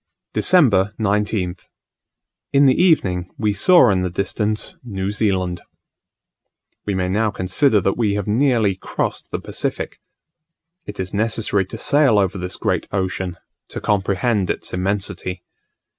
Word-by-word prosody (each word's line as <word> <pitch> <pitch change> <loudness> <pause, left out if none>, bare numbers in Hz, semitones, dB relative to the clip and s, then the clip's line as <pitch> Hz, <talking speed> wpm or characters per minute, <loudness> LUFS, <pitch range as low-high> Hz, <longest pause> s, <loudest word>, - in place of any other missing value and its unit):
December 110 - +3
19th. 100 -3 -1 0.8
In 140 0 +5
the 130 +4 +4
evening 95 - +2
we 105 -2 0
saw 125 - +5
in 95 -1 +1
the 90 - -1
distance 105 +4 -2
New 100 -4 -3
Zealand. 95 -5 -1 1.3
We 100 - 0
may 90 -1 0
now 105 +4 +1
consider 105 +5 +2
that 95 +5 -1
we 105 -3 +1
have 105 -2 -2
nearly 115 -2 +2
crossed 95 - -4
the - - -3
Pacific. - - -4 0.9
It 105 - -8
is 95 -1 -4
necessary 105 -2 0
to 115 - -7
sail 140 -2 +3
over 95 -1 +1
this 90 0 -4
great - - -1
ocean 95 -2 -2 0.3
to - - -6
comprehend 100 0 0
its - - -3
immensity. 95 -1 -3
100 Hz, 135 wpm, -20 LUFS, 95-110 Hz, 1.3 s, In